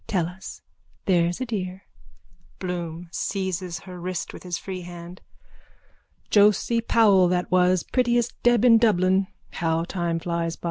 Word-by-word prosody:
Tell 180 -5 0
us, 180 +3 -9 0.4
there's 175 -2 +2
a - - 0
dear. 190 -5 -4 0.7
BLOOM: 175 -2 -5
(Seizes 185 -4 -3
her 180 -1 -10
wrist 180 0 -4
with - - -10
his 175 -2 -4
free 185 0 -6
hand.) 175 0 -10 1.1
Josie 210 +3 +4
Powell 205 -5 +4
that 180 0 -1
was, 180 0 +3
prettiest 240 -2 +1
deb 240 -1 +4
in 230 -2 +7
Dublin. 190 -3 +3 0.2
How 165 0 -1
time 170 -2 -2
flies 170 -1 -2
by! - - -31
185 Hz, 140 wpm, -24 LUFS, 175-200 Hz, 1.1 s, in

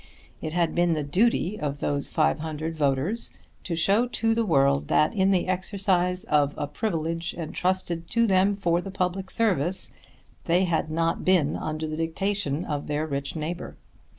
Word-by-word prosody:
It 155 - -4
had 170 -2 +1
been 175 -1 +2
the 155 -2 -1
duty 195 +5 +1
of 145 -1 -3
those 140 0 -1
500 160 0 -1
voters 150 - 0 0.3
to 170 - -3
show 200 +9 +3
to 225 -2 +1
the 230 0 +1
world 140 -3 +3
that 150 - +3
in 190 -3 +2
the 190 -2 +2
exercise 185 -1 +1
of 145 -1 +2
a 150 - -1
privilege 165 0 -2
entrusted 170 0 -2
to 230 0 +3
them 195 0 +3
for 175 -3 +1
the 195 - -7
public 185 0 -2
service 185 -6 0 0.5
they 175 +2 +3
had 165 -3 0
not 165 +1 0
been 175 -6 +3
under 155 0 -3
the 155 0 -4
dictation 165 -1 -1
of 145 -1 -3
their 150 +1 -1
rich 140 -1 -3
neighbour. 165 +3 -5
170 Hz, 165 wpm, -26 LUFS, 155-190 Hz, 0.5 s, show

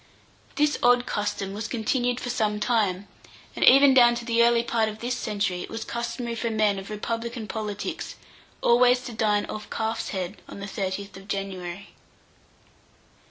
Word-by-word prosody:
This 295 0 +2
odd 245 0 +4
custom 205 -1 -2
was 215 +2 -4
continued 245 +1 0
for 245 - -3
some 215 -3 0
time, 210 -4 0 0.5
and - - -1
even 275 +1 +8
down 240 -2 +6
to 235 0 -5
the 230 -1 +2
early 235 0 +4
part 225 -2 +1
of 215 - -8
this 240 +2 -2
century 205 -6 -2
it - - -7
was 225 0 -5
customary 235 0 -4
for 230 0 -2
men 215 -3 +1
of 195 - -9
republican 230 +2 -4
politics 210 0 -4 0.5
always 250 +1 +5
to 250 -2 -7
dine 210 -2 +1
off 210 0 -7
calf's 225 0 -2
head 190 0 -4
on - - -9
the 200 - -5
30th 195 0 -4
of 195 +1 -13
January. 195 -1 -5
220 Hz, 165 wpm, -26 LUFS, 200-240 Hz, 0.5 s, even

